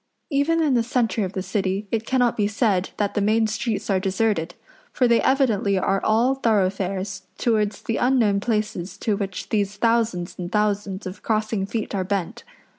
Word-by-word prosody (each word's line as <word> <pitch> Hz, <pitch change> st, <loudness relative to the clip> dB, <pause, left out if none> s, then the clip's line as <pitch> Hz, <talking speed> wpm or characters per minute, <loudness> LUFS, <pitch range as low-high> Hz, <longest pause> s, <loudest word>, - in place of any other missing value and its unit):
Even 315 Hz, +4 st, +2 dB
in 295 Hz, -4 st, +2 dB
the 240 Hz, -, +3 dB
centre 230 Hz, -2 st, 0 dB
of 185 Hz, -, -6 dB
the 190 Hz, -, -3 dB
City 195 Hz, +1 st, -1 dB
it 225 Hz, -1 st, -1 dB
cannot 245 Hz, -3 st, +2 dB
be 205 Hz, -2 st, +1 dB
said 205 Hz, -3 st, +1 dB
that 205 Hz, -1 st, 0 dB
the 205 Hz, -, 0 dB
main 220 Hz, +2 st, +3 dB
streets 220 Hz, 0 st, -2 dB
are 195 Hz, -2 st, +2 dB
deserted; 190 Hz, -3 st, 0 dB, 0.4 s
for 250 Hz, -, +2 dB
they 235 Hz, -1 st, +4 dB
evidently 225 Hz, -8 st, +2 dB
are 195 Hz, +1 st, +1 dB
all 230 Hz, +5 st, +3 dB
thoroughfares 195 Hz, -5 st, -1 dB
towards 215 Hz, -3 st, 0 dB
the 225 Hz, -, -1 dB
unknown 240 Hz, -6 st, +3 dB
places 210 Hz, -4 st, -2 dB
to 215 Hz, -, 0 dB
which 195 Hz, -2 st, -5 dB
these 205 Hz, -2 st, 0 dB
thousands 225 Hz, -7 st, 0 dB
and 175 Hz, 0 st, -5 dB
thousands 205 Hz, -2 st, -1 dB
of 185 Hz, +1 st, -7 dB
crossing 215 Hz, -2 st, -1 dB
feet 220 Hz, 0 st, -3 dB
are 195 Hz, -2 st, 0 dB
bent. 185 Hz, -2 st, -3 dB
210 Hz, 180 wpm, -23 LUFS, 195-230 Hz, 0.4 s, they